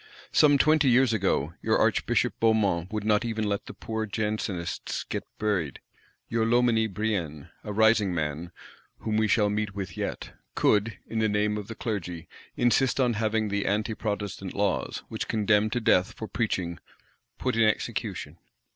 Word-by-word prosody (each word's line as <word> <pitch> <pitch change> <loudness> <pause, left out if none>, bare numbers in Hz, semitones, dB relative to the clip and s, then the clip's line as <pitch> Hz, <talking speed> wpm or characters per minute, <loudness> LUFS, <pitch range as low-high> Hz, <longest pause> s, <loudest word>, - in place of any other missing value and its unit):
Some 145 -2 +5
twenty 155 -1 +4
years 125 -1 +4
ago, 90 -7 0
your - - +2
Archbishop - - +1
Beaumont 105 -6 +2
would 105 -1 -2
not 105 0 +2
even 110 -2 -2
let 100 -1 -2
the - - -7
poor 110 -1 -4
Jansenists 105 -4 -3
get - - -5
buried: 90 - -1 0.5
your 115 -1 0
Loménie 115 -2 +3
Brienne 90 -8 -3
(a 105 - -5
rising 110 -1 +4
man, 80 +1 -3 0.5
whom 110 - -1
we 110 0 +3
shall 105 -1 +3
meet 105 -1 -2
with 95 -2 -5
yet) - - -4 0.2
could, 105 +2 +2
in 115 - -3
the 110 -1 +2
name 105 0 +1
of 105 -2 -5
the 115 - -7
Clergy, 90 -8 -4 0.3
insist 125 +2 +2
on 125 -2 +3
having 110 0 0
the 100 0 -1
Anti 105 +2 0
protestant 105 -3 -4
laws, 100 -2 -1
which - - -4
condemn 105 0 +2
to 120 - -1
death 95 -5 +3
for 110 - -7
preaching, 90 -8 -2 0.6
"put 130 -2 -1
in 115 - +2
execution." 105 -7 -2
105 Hz, 165 wpm, -27 LUFS, 100-110 Hz, 0.6 s, Some